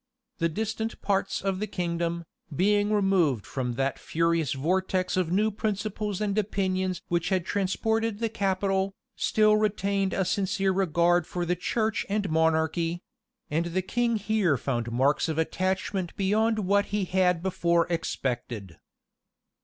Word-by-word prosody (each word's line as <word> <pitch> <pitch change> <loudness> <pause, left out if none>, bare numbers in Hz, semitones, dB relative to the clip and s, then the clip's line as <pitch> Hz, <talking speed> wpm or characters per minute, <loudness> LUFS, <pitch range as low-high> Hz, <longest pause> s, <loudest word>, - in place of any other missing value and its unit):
The 165 - +2
distant 220 +5 -3
parts 195 -1 0
of 195 -1 -1
the 215 - -2
kingdom, 170 -2 -2 0.3
being 205 +4 +2
removed 185 - +2
from 125 -3 -3
that 135 +2 -1
furious 165 -3 0
vortex 185 +5 0
of 180 -3 0
new 210 +4 +2
principles 210 -1 -2
and 205 -2 -1
opinions 185 -3 -1
which 170 -1 0
had 185 -3 0
transported 220 +3 0
the 230 +1 0
capital, 195 -2 0 0.2
still 215 -1 +3
retained 200 -2 0
a 190 - 0
sincere 195 +1 +1
regard 175 -2 +2
for 175 -1 -3
the 180 +1 +1
church 220 +5 -1
and 200 -3 -1
monarchy; 160 +2 +1 0.5
and 160 +3 +1
the 185 +2 -1
king 235 +4 0
here 205 -7 +1
found 120 -2 -2
marks 135 +7 +2
of 160 - -2
attachment 185 +2 -1
beyond 220 +3 +2
what 200 0 +2
he 205 -1 -1
had 180 -2 +2
before 170 -2 +2
expected. 120 - -3
185 Hz, 140 wpm, -27 LUFS, 170-205 Hz, 0.5 s, still